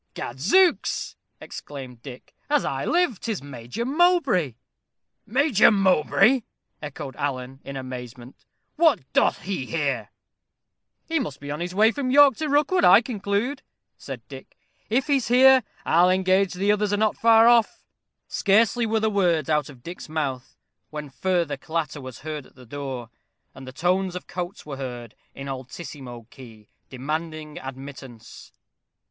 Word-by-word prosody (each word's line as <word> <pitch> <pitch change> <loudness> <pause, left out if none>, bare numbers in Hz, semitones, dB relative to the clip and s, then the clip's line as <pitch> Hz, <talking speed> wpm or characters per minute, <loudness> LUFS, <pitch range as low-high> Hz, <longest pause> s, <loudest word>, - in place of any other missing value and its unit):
"Gad 120 +2 -6
zooks!" 355 - +2 0.2
exclaimed 130 -5 -9
Dick. 130 -2 -11 0.2
"As 295 -1 +2
I 135 0 -2
live, 340 - +1
'tis 220 - -4
Major 125 - -6
Mowbray!" 275 - +2 0.7
"Major 260 -2 +4
Mowbray!" 195 - +3 0.4
echoed 145 -2 -7
Alan, 135 -2 -4
in 140 0 -7
amazement 125 -1 -9 0.3
"What 315 - +4
doth - - +2
he 185 -10 -4
here?" 145 -4 -2 1.0
"He 325 -1 0
must 150 - -5
be 145 0 -7
on 150 - -4
his 180 +1 -4
way 220 +3 +5
from 265 0 -3
York 280 +1 +6
to 310 -1 -2
Rookwood, 300 +6 +2
I - - +8
conclude," 220 +4 -2 0.3
said - - -9
Dick. - - -12 0.3
"If 250 +4 +1
he's 280 -4 +1
here, 260 +2 +6 0.2
I'll 175 +3 +4
engage 185 0 +2
the 200 +3 +2
others 210 -1 0
are 205 - +1
not 215 0 +1
far 225 0 +5
off." 235 -2 +3 0.4
Scarcely 225 +3 +2
were 220 0 +1
the 220 - +1
words 175 -8 +1
out 150 -2 +1
of 130 -4 -14
Dick's 175 -2 -9
mouth, 135 -5 -4 0.3
when 150 -2 -7
further 170 -2 -1
clatter 155 0 -4
was 130 -2 -10
heard 150 -2 -6
at - - -25
the 125 - -15
door, 130 -2 -6 0.4
and 130 0 -11
the - - -7
tones 180 +5 0
of 180 - -6
Coates 180 +3 -6
were 140 -3 -6
heard, 120 -4 -7 0.2
in 135 - -7
altissimo 130 -2 -8
key, 110 -5 -14 0.2
demanding 155 +3 -5
admittance. 135 -3 -10
170 Hz, 150 wpm, -24 LUFS, 135-225 Hz, 1.0 s, I